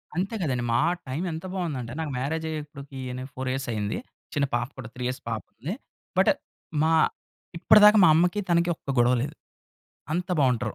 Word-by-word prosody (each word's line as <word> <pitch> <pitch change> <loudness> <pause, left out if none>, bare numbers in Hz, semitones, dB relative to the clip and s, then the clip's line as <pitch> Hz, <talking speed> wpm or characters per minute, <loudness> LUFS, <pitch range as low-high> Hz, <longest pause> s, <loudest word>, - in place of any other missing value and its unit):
అంతే 195 +5 -1
గదండీ. 125 -6 0
మా 115 - +4 0.3
టైము 150 +8 -2
ఎంత 160 +3 -6
బావుందంటే, 140 -10 -3
నాకు 155 -3 -2
మ్యారేజయ్యి 160 +3 -2
ఇప్పడికి 140 -2 -10 0.2
నేను 130 +2 -6
4 130 0 -3
ఇయర్స్ 135 0 -3
అయ్యింది. 105 -1 -2 0.4
చిన్న 145 -1 +2
పాప 120 0 0
కూడా 120 -4 -7
3 125 - -5
ఇయర్స్ 125 - -4
పాపుంది. 120 - -5 0.4
బట్ - - +6 0.5
మా 160 - +3 0.7
ఇప్పడిదాకా 210 +4 +7
మా 165 - +8
అమ్మకి, 180 +5 +3
తనకి 170 0 +3
ఒక్క 140 - -12
గొడవ 120 +1 +5
లేదు. 150 +2 -5 0.8
అంత 180 +3 -1
బావుంటరు. 125 -4 +1
140 Hz, 170 wpm, -26 LUFS, 125-170 Hz, 0.8 s, మా